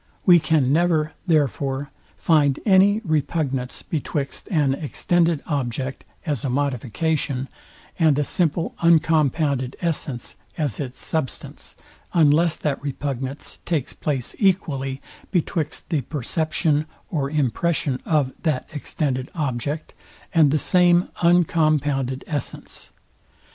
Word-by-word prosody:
We 175 -2 +8
can 150 -4 +2
never, 160 -2 +2
therefore, 140 -3 0 0.3
find 145 -4 +3
any 200 +1 +5
repugnance 145 -4 -1
betwixt 145 -2 -3
an 150 -9 +2
extended 165 +2 0
object 130 -2 -3 0.2
as 145 -8 -2
a 135 - -1
modification, 135 +1 -1 0.5
and 155 -4 +4
a 150 - +2
simple 165 +2 0
uncompounded 155 -5 +2
essence, 150 -7 -3 0.2
as 145 -8 -1
its 130 -3 -5
substance, 155 -5 -4 0.4
unless 160 +1 +4
that 145 -3 -2
repugnance 140 -1 -4
takes 155 -7 -1
place 135 -5 -3
equally 140 -9 0 0.3
betwixt 165 -3 -2
the 155 -4 +2
perception 155 +3 0 0.2
or 140 -5 -1
impression 145 0 0
of 145 -5 +1
that 155 -7 -1
extended 135 -3 -2
object, 145 0 -3 0.4
and 160 -4 +5
the 155 - +2
same 175 +2 +4
uncompounded 155 -6 +2
essence. 145 -4 -5
150 Hz, 105 wpm, -23 LUFS, 135-165 Hz, 0.5 s, We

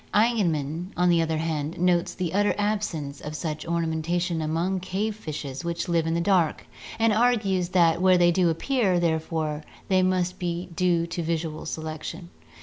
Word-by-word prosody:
Eigenmann, 175 -8 +1
on 180 0 +3
the 170 -1 +4
other 160 -1 0
hand, 155 -1 -2
notes 175 -1 +2
the 175 -3 -3
utter 205 +1 +2
absence 200 -9 -2
of 150 +1 -6
such 155 -1 -4
ornamentation 170 +1 -1
among 165 +5 -1
cave 200 +4 -2
fishes 150 -7 -6
which 170 0 -3
live 165 -2 +1
in 165 - 0
the - - +1
dark, 175 -4 +2 0.3
and 225 -1 +3
argues 210 -6 +2
that 170 -2 +3
where 185 -1 +5
they 175 0 +5
do 175 0 +3
appear, 190 +1 +1
therefore, 160 -2 -1 0.3
they 185 -1 +4
must 185 -1 0
be 175 0 -3
due 175 -1 +2
to 170 +1 -4
visual 160 -1 -3
selection. 160 +2 -6
170 Hz, 165 wpm, -25 LUFS, 160-185 Hz, 0.3 s, where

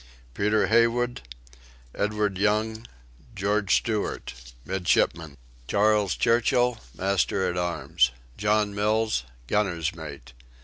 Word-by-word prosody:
Peter 105 +7 +2
Haywood, 115 +2 +2 0.7
Edward 105 -2 -1
Young, 110 +2 0 0.5
George 100 0 +1
Stewart: 110 -3 -2 0.3
Midshipmen. 85 -5 0 0.3
Charles 105 -1 +2
Churchill: 120 0 +2 0.2
Master 95 0 +1
at 90 - -2
Arms. 85 -7 +1 0.3
John 105 +2 +1
Mills: 105 - 0 0.2
Gunner's 85 -1 0
Mate. 70 -7 -10
105 Hz, 90 wpm, -26 LUFS, 90-110 Hz, 0.7 s, Peter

